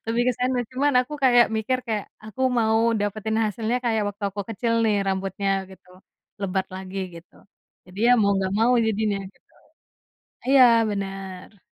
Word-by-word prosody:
lebih 230 +1 +1
ke - - +3
sana 250 0 +1
cuman 280 +3 +1
aku 255 +4 -6
kayak 245 -2 +6
mikir 255 +4 0
kayak 215 -3 -2 0.2
aku 215 +4 -10 0.2
mau 220 -1 +2 0.2
dapetin 215 +2 -2
hasilnya 225 +3 -1
kayak 220 -2 +1
waktu 205 +1 -10
aku 200 +1 -6
kecil 230 +2 -2
nih 215 - +2
rambutnya 195 +1 -2 0.2
gitu, 190 - -17 0.5
lebat 190 -1 -1
lagi 190 +1 -7 0.2
gitu, 170 +1 -14 0.5
jadi 180 +2 -13
ya 245 - +7
mau 200 - +3
nggak 190 -1 -1
mau 230 +3 +4
jadinya 210 -2 0
gitu, - - -35 1.0
iya 270 0 +6 0.3
bener. 195 -1 -6
215 Hz, 160 wpm, -24 LUFS, 195-235 Hz, 1.0 s, ya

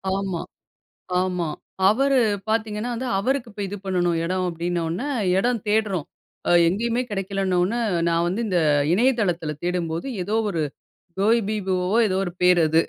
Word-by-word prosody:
ஆமா, 195 -3 -2 0.8
ஆமா. 180 -3 -1 0.4
அவரு 270 +4 +3 0.3
பாத்தீங்கன்னா 220 +1 -1
வந்து 250 +2 -3
அவருக்கு 250 +3 -1
இப்போ 205 - -7
இது 205 - -5
பண்ணணும் 175 -3 +1
இடம் 185 +1 -1
அப்படினோன்னே, 170 - -2 0.3
இடம் 240 +3 +1
தேடுறோம். 205 -7 +1 0.4
அ - - +2 0.2
எங்கேயுமே 230 +7 0
கிடைக்கலனோன்னே, 195 +1 0 0.3
நான் 170 0 +2
வந்து 195 +7 -1
இந்த 180 -3 +2 0.3
இணையதளத்தில 190 -9 +1
தேடும்போது, 175 +2 -2 0.2
ஏதோ 210 +4 -2
ஒரு 165 -4 -1 0.6
Goibiboவோ 200 -3 +1
ஏதோ 190 0 0
ஒரு 175 - -4
பேர் 180 -1 +5
அது. 160 +1 +4
190 Hz, 130 wpm, -23 LUFS, 175-220 Hz, 0.8 s, பேர்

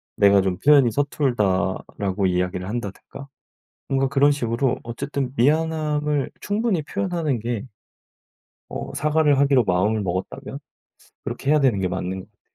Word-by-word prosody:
"내가 100 -1 +5
좀 95 -2 -1
표현이 140 -4 +5
서툴다."라고 105 -7 -1
이야기를 90 0 -1
한다든가 115 +5 -6 0.6
뭔가 135 0 +1
그런 140 +2 +4
식으로 125 -1 0
어쨌든 135 +2 -4
미안함을 150 +1 +1
충분히 205 -5 0
표현하는 165 -5 -2
게 115 -1 -3 1.0
어 - - -6
사과를 150 -1 +2
하기로 140 -3 +4
마음을 105 +3 +1
먹었다면 95 0 -4 0.7
그렇게 140 - -4
해야 150 -1 +4
되는 125 -7 +3
게 95 - 0
맞는 90 +1 -3
것 - - -10
같아요. - - -45
130 Hz, 330 characters per minute, -23 LUFS, 100-145 Hz, 1.0 s, 내가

